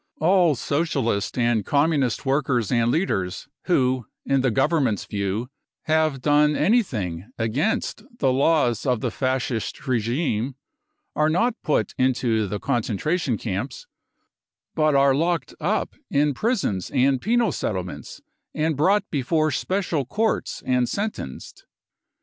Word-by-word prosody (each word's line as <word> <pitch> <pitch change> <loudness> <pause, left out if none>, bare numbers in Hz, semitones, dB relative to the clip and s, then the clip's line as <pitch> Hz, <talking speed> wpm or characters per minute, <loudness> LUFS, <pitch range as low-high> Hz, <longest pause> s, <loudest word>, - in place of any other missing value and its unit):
All 175 -2 +4
Socialist 135 -8 -1
and 120 -3 +2
Communist 140 - +1
workers 135 -4 +1
and 120 -2 +2
leaders 95 - -1 0.2
who 130 - +1 0.2
in 135 -1 +2
the 130 - +2
Government's 135 - +1
view 100 +5 -3 0.3
have 155 -4 +1
clone 150 0 +4
anything 110 - 0
against 130 - -1 0.2
the 135 - +2
laws 135 -5 +2
of 125 -3 +1
the 125 - -1
Fascist 130 -1 -2
regime 125 +1 0 0.6
are 155 0 +2
not 225 +10 +2
put 150 - 0
into 120 -4 +1
the 100 +2 -4
concentration 125 - -1
camps, 110 - -4 0.9
but 155 -2 +2
are 140 0 +5
locked 165 -1 0
up - - -1 0.2
in 145 +1 +2
prisons 185 - -1
and 135 -1 +2
penal 235 +2 +2
settlements 300 - -5 0.3
and 155 0 0
brought 195 +8 +2
before 155 +2 +1
special 175 0 -1
courts 220 - -1
and 125 -1 +1
sentenced. 200 - -5
135 Hz, 120 wpm, -23 LUFS, 120-160 Hz, 0.9 s, are